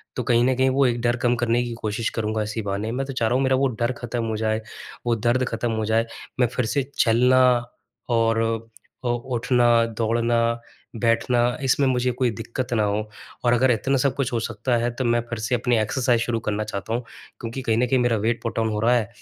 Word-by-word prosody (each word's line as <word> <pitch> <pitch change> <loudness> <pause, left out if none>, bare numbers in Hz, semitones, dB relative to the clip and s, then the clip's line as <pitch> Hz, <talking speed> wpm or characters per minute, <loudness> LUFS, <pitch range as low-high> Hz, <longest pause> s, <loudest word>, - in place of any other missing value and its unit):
तो 125 - -2
कहीं 120 0 +3
न 130 0 +2
कहीं 130 0 +3
वो 135 +1 +3
एक 120 -1 +1
डर 120 0 +2
कम 120 0 +1
करने 120 0 +1
की 120 -1 -4
कोशिश 110 +2 -1
करूँगा 110 -1 -1
इसी 110 +1 -4
बहाने, 100 +2 -3
मैं 135 +2 -2
तो 135 - -6
चाह 120 -3 0
रहा 120 - +1
हूँ 135 - +2
मेरा 130 0 +3
वो 135 +1 +2
डर 120 +2 +2
ख़त्म 120 0 -3
हो 110 -1 -2
जाए, 110 0 0 0.4
वो 120 - +2
दर्द 120 +3 +1
ख़त्म 115 +1 -2
हो 110 -1 -1
जाए। 110 +1 +2 0.3
मैं 125 - +4
फ़िर 125 +1 -2
से 140 +5 0
चलना 125 +3 +4 0.7
और 115 0 +2 0.6
अ, - - +1
उठना, 120 -1 +2
दौड़ना, 115 +1 0 0.4
बैठना 115 +1 +1 0.2
इसमें 135 +1 +2
मुझे 125 0 +1
कोई 125 0 0
दिक्कत 125 +3 -4
ना 110 - +2
हो 105 +1 -1 0.4
और 120 - +4
अगर 130 +1 +4
इतना 135 +4 +1
सब 135 0 +1
कुछ 140 -2 -1
हो 115 - +1
सकता 115 +2 -1
है, 120 +1 0
तो 130 +2 -4
मैं 120 0 +3
फ़िर 115 - -4
से 120 +3 0
अपनी 120 0 +1
एक्सरसाइज़ 120 +1 +1
शुरू 120 -1 -1
करना 105 0 0
चाहता 105 +2 -5
हूँ। 120 - 0 0.4
क्योंकि 120 +3 -5
कहीं 115 -3 0
न 125 - +3
कहीं 130 +1 +2
मेरा 120 -2 +2
वेट 115 +3 -1
पुटऑन 115 -1 -1
हो 105 - -2
रहा 120 +3 +3
है 115 -2 +1
120 Hz, 230 wpm, -23 LUFS, 115-125 Hz, 0.7 s, मैं